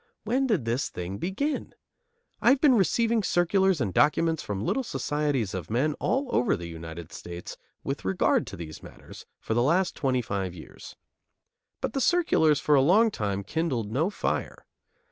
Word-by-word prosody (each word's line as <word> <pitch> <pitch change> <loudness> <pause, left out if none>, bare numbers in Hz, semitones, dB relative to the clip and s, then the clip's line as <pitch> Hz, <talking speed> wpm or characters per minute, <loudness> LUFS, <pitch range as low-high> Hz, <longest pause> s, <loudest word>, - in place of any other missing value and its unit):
When 255 +5 +1
did 200 - +1
this 120 +5 -1
thing 90 +3 -6
begin? 245 - -2 0.7
I - - +5
have 270 - +5
been 285 -3 +5
receiving 230 +2 +2
circulars 190 -1 +2
and 105 -7 -1
documents 160 - +2
from 100 0 -4
little 270 - +1
societies 145 - -1
of 90 -4 -5
men 130 +7 +1
all 270 +2 0
over 125 - +2
the 85 - -7
United 80 0 -8
States 85 0 -8 0.3
with 135 +1 -4
regard 95 -1 +1
to - - -8
these 80 -2 -8
matters, - - -13
for - - -3
the 120 - +2
last 175 +8 +2
twenty 130 -4 0
five 95 -4 -3
years. 80 - -12 0.9
But - - -2
the 270 - -1
circulars 235 - +3
for 150 - +1
a 140 - +6
long 210 +10 +4
time 100 - -2
kindled 125 - -2
no 155 - +1
fire. - - -3
145 Hz, 170 wpm, -27 LUFS, -, 0.9 s, a